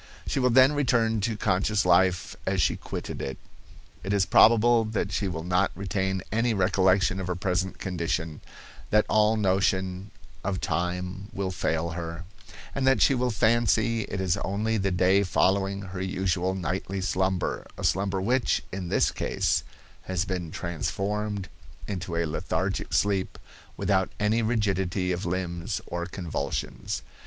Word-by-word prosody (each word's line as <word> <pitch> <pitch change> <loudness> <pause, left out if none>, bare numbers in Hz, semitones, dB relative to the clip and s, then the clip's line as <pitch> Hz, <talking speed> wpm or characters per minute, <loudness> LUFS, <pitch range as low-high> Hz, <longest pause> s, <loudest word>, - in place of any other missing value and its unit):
She - - -1
will 125 -1 +3
then 130 +3 +6
return 115 -6 +2
to 110 0 -1
conscious 100 +1 +1
life 90 -1 +3
as - - +1
she - - +3
quitted - - -6
it. 65 - -4 0.7
It 95 +2 -1
is 100 -2 +3
probable 115 +2 +5
that 110 -1 -2
she 100 - -1
will 80 -3 -4
not 90 +2 +2
retain 95 0 -2
any 115 +1 +1
recollection 95 -1 +3
of 95 - -4
her 90 - -1
present 95 0 -1
condition, 85 -4 -3 0.5
that 105 0 +4
all 110 +1 +3
notion 95 -1 0 0.3
of 95 -1 -1
time 90 +2 -2
will 95 -1 -2
fail 85 -2 -1
her, 85 0 -5 0.5
and 135 -1 0
that 135 - +4
she - - +5
will 125 -1 +1
fancy 115 0 +2
it 95 - -5
is 95 -2 +1
only 110 +3 -1
the 95 -1 0
day 95 +2 +3
following 100 +1 +1
her 90 -1 -6
usual 95 -1 -1
nightly 95 +2 -3
slumber, 95 0 -1
a - - -7
slumber 95 0 +1
which, 120 +6 +1
in 95 -2 -4
this - - +2
case, - - 0 0.4
has 95 0 -1
been 90 -4 -3
transformed 100 +5 -3 0.4
into 90 -3 -4
a 85 0 +1
lethargic 75 - -2
sleep, 100 -2 +1 0.4
without 95 -2 +1
any 110 +2 +2
rigidity 95 -5 0
of 90 +1 -2
limbs 90 +2 -2
or 85 0 -4
convulsions. 90 -4 -4
95 Hz, 150 wpm, -27 LUFS, 90-105 Hz, 0.7 s, then